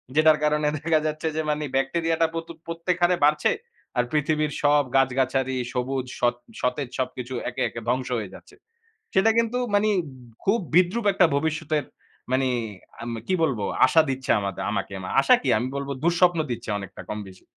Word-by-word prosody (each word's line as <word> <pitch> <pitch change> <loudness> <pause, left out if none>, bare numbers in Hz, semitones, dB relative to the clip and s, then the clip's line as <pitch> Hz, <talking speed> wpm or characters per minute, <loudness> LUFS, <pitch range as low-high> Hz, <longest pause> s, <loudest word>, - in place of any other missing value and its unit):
যেটার 155 0 +6
কারণে 150 0 +2
দেখা 155 +1 +2
যাচ্ছে 155 +1 -3
যে 160 - +1
মানে 150 0 0
ব্যাকটেরিয়াটা 165 +4 +1
প্রতু 165 0 -5 0.2
প্রত্যেক 165 +1 -2
হারে 175 +1 +4
বাড়ছে। 150 0 +3 0.5
আর 120 - +4
পৃথিবীর 150 0 +1
সব 145 0 +5
গাছ-গাছারি 130 0 +2 0.2
সবুজ 130 +1 -1
সৎ 120 0 +2 0.3
সতেজ 125 +1 -1
সবকিছু 130 0 -3 0.2
একে, - - -5
একে, 115 - -7
ধ্বংস 130 +1 0
হয়ে 105 -4 -5
যাচ্ছে। - - -14 0.6
সেটা 200 +4 +5
কিন্তু 230 +2 +1 0.2
মানে 210 +1 +3 0.5
খুব 210 +4 +3 0.2
বিদ্রূপ 185 +6 +3
একটা 185 -2 +5
ভবিষ্যতের 155 -1 -1 0.5
মানে 130 0 +2 0.5
আম 120 0 -4
কি 185 - +1
বলবো 120 -10 0 0.2
আশা 160 - +5
দিচ্ছে 130 -1 -3
আমাদ 100 -2 -3 0.2
আমাকে। - - -3 0.3
আশা - - +6
কি? - - -2
আমি 125 +3 -2
বলব 140 0 -4 0.2
দুঃস্বপ্ন 175 0 +3
দিচ্ছে 120 0 -5
অনেকটা 100 -2 -9
কম 105 - -4
বেশি। 95 -1 -16
150 Hz, 165 wpm, -25 LUFS, 130-165 Hz, 0.6 s, যেটার